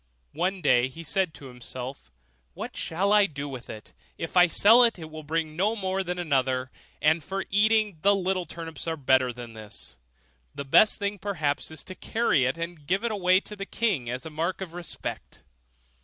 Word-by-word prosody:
One 185 +4 -1
day 125 -5 +4
he 165 +6 -10
said 185 +2 +1
to 140 - -12
himself, 125 - -7 0.5
'What - - -6
shall 195 +5 0
I 205 -1 +6
do 145 -3 -6
with 130 -3 -8
it? 110 - -10 0.2
if 165 - -5
I 180 0 +7
sell 225 +8 +7
it, 230 -3 +3
it 160 -2 -9
will 155 0 -7
bring 155 0 -2
no 205 +6 +1
more 190 -2 -1
than 180 0 -3
another; 130 -6 0 0.3
and 155 +1 +3
for 195 +4 -4
eating, 210 -2 +3
the 200 +1 +5
little 185 -1 -1
turnips 165 -1 -7
are 165 0 -1
better 130 -2 +3
than 120 -1 -9
this; 110 - -10 0.6
the 140 - -5
best 210 +10 +5
thing 200 -1 -3
perhaps 160 -8 -1
is 155 -2 -6
to 185 - -8
carry 185 - +1
it 130 +5 0
and 165 -3 -6
give 195 +6 +1
it 190 -4 +3
to 210 - -6
the 195 0 -6
king 195 - 0
as 125 +1 -4
a 160 - -7
mark 165 +4 -2
of 185 -4 -6
respect. 175 -1 -6
165 Hz, 195 wpm, -27 LUFS, 140-195 Hz, 0.6 s, I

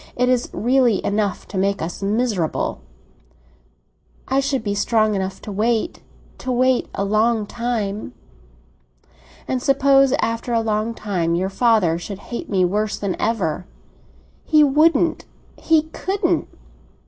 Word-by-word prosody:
It 250 0 +1
is 250 -1 +1
really 245 -3 +2
enough 205 -1 -1
to 190 - -3
make 200 +1 +1
us 170 +4 -5
miserable." 205 -5 -1 1.5
"I 265 +1 +2
should 275 -3 -1
be 205 -2 -1
strong 215 +1 +2
enough 190 -1 -3
to 210 - -6
wait—to 230 - -3
wait 255 0 +2
a 200 - -1
long 215 +2 +2
time." 215 - -3 1.3
"And 255 -1 -1
suppose 275 0 +4
after 230 +1 -1
a 230 - +3
long 220 +1 -1
time 175 -6 -1
your 185 +2 -1
father 195 -6 +2
should 195 +3 -7 0.2
hate - - -5
me 185 -3 +2
worse 210 +4 -1
than 200 -3 -2
ever?" 185 -6 -1 0.8
"He 305 -2 +4
wouldn't—he 310 +1 +1
couldn't!" 390 +2 -1
220 Hz, 125 wpm, -21 LUFS, 200-255 Hz, 1.5 s, suppose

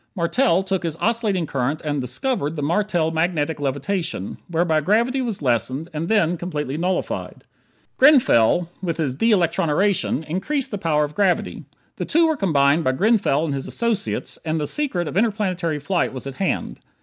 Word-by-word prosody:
Martell 175 +1 +2
took 190 -1 -1
his 165 -3 -3
oscillating 210 -3 0
current 140 +1 -2
and 145 -2 -1
"discovered" 145 - -2
the 145 - -3
Martel 175 0 +1
Magnetic 160 -2 -1
Levitation, 145 - -3
whereby 165 -2 +1
gravity 235 - +1
was 225 - -4
lessened, 130 +5 0
and 155 +2 -3
then 180 -5 +2
completely 150 -5 -4
nullified. 180 +3 -3 0.5
Grenfell, 180 - +5
with 170 -4 -2
his 150 -6 -1
de 225 - +1
electroniration, 175 -3 +1
increased 255 - -2
the 205 - -3
power 155 -5 +1
of 150 0 -4
gravity. 195 -1 0 0.3
The - - -3
two 330 +1 +3
were 315 - +1
combined 155 - +2
by 130 - +1
Grenfell 190 - +2
and 150 - -2
his 135 -1 -4
associates 230 -4 -2
and 160 0 -1
the 150 - -1
secret 195 - -1
of 150 - -5
interplanetary 190 -7 0
flight 170 +3 -1
was 130 - -7
at 135 - -5
hand. 195 - -2
170 Hz, 165 wpm, -22 LUFS, 150-205 Hz, 0.5 s, Grenfell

